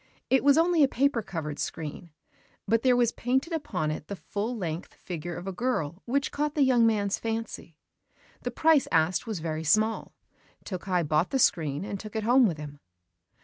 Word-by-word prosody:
It 265 - +4
was 285 +1 +5
only 335 0 +4
a 280 - +7
paper 265 -2 +1
covered 155 -7 -5
screen; 155 +2 -5 0.6
but 225 +2 +3
there 255 0 +4
was 240 -2 +3
painted 265 +7 -1
upon 155 - -2
it 155 0 -6
the 200 - -5
full 215 +5 -4
length 170 -3 -5
figure 175 -1 -6
of 175 - -7
a 195 - -3
girl 180 - -2
which 275 +3 0
caught 295 0 -2
the 295 - +4
young 245 -3 +4
man's 205 -3 0
fancy. 225 -8 -5 0.6
The - - -3
price 315 -4 +3
asked 165 +5 +2
was 210 -7 -3
very 160 -1 -3
small: 215 +8 +1 0.5
Tokkei 180 -3 -2
bought 155 +4 +2
the 270 - 0
screen, 155 - +1
and 200 -1 -5
took 215 +1 -9
it 220 - -1
home 245 +2 +5
with 165 -5 -2
him. 145 -1 -9
210 Hz, 190 wpm, -27 LUFS, 165-250 Hz, 0.6 s, a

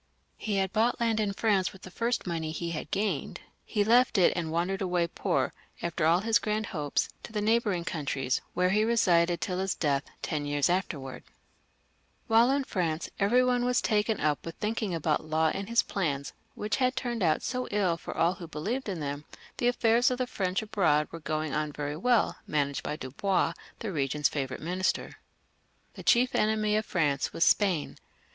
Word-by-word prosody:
He 210 -2 -2
had 190 0 0
bought 230 +3 +2
land 230 -2 +1
in 210 -2 +1
France 200 -2 +1
with 190 - -16
the 185 - -9
first 235 +4 -1
money 165 -3 -2
he 170 +1 -4
had 155 -2 -5
gained; 205 +4 -2 0.2
he 210 -3 0
left 235 +1 +4
it 180 - +5
and 165 -2 -2
wandered 180 +4 -1
away 180 -2 +1
poor, 170 - -1 0.3
after 170 -2 0
all 170 +3 +4
his 225 +1 +3
grand 215 0 -1
hopes, 150 -4 -1
to - - -10
the 215 - -2
neighbouring 210 -5 +1
coun 155 -6 -4
tries, 130 -2 0
where 180 0 +2
he 210 +2 +3
lived 175 -7 +3
tUl 185 -1 -2
his 190 0 -1
death, 140 -3 +1 0.2
ten 145 -2 -2
years 145 +3 +2
after 180 -4 -1
wards. 135 -1 -9 1.0
While 230 +1 +5
inside 275 0 +1
France 165 -4 -1
every 235 +6 +4
one 250 -1 +2
was 245 0 +2
taken 215 0 +1
up 150 -1 0
with 165 - -7
thinking 210 -3 -2
about 155 -1 0
Law 160 0 +2
and 195 +2 -5
his 235 0 +4
plans, 140 -8 -2 0.2
which 210 +4 -2 0.2
turned 240 -3 -2
out 160 -4 +2
so 250 -1 -2
ill 195 -5 +1
for - - -8
all 170 +2 +3
who 175 -3 -9
believed 205 - -3
in 180 -5 -3
them, 145 +1 -4 0.3
the 240 - +1
affairs 240 0 +3
of 250 - -1
the 255 - 0
French 190 -3 -2
abroad 160 -8 +2
were 165 - -7
going 155 -1 -2
on 150 +1 -1
very 145 0 -4
well, 240 +8 +2
managed 140 -2 0
by 150 - -3
Dubois, 155 +9 0 0.2
the 220 - -4
regent's 145 -2 0
favourite 135 -2 -4
Minister. 185 +3 -1 0.8
The - - -9
chief 250 +1 +3
enemy 215 0 +2
of 215 0 0
France 145 -6 0
was 165 - +2
Spain. 185 -7 +2
185 Hz, 195 wpm, -29 LUFS, 155-220 Hz, 1.0 s, it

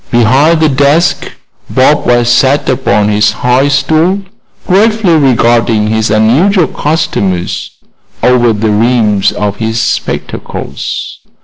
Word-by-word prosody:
Behind 130 +8 +2
the 160 - +3
desk 145 +4 0 0.4
Bob 140 +3 +1
West 120 0 +2
sat 140 +2 0
upon 125 -5 0
his 105 0 +1
high 125 +3 +1
stool, 160 +7 0 0.4
gravely 205 -1 +2
regarding 120 -6 +1
his 110 0 -1
unusual 140 - +2
customers 100 - -2 0.5
over 125 -2 +3
the 110 0 -1
rims 105 -2 +1
of 105 -1 -3
his 110 +1 -2
spectacles. 120 - -5
125 Hz, 110 wpm, -10 LUFS, 110-150 Hz, 0.5 s, the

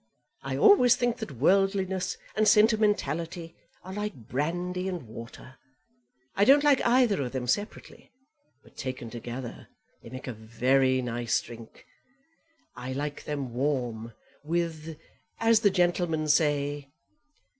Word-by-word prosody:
I - - -4
always 375 - +6
think 240 -1 -1
that 220 - -6
worldliness 190 - +1 0.2
and 215 +1 +2
sentimentality 180 -7 +2 0.3
are 185 - -8
like 210 -1 -4
brandy 175 +6 -2
and 180 -5 -5
water. 115 +3 -11 0.8
I 200 - +3
don't 280 +6 +6
like 285 -3 +4
either 240 - +3
of 125 -2 -4
them 130 -2 -3
separately, 205 - -4 0.5
but - - -21
taken 130 -4 -6
together 120 +1 -7 0.3
they - - -12
make 130 +2 -8
a 125 - -5
very 130 +4 +1
nice 120 -1 -1
drink. 115 -1 -12 0.9
I 130 +1 -6
like 145 +2 -5
them 140 -5 -4
warm, 120 -4 -2 0.3
with 165 -1 -3 0.4
as 225 -1 +4
the 215 -2 +4
gentlemen 175 -4 0
say." 145 -1 +1
155 Hz, 125 wpm, -27 LUFS, 130-195 Hz, 0.9 s, always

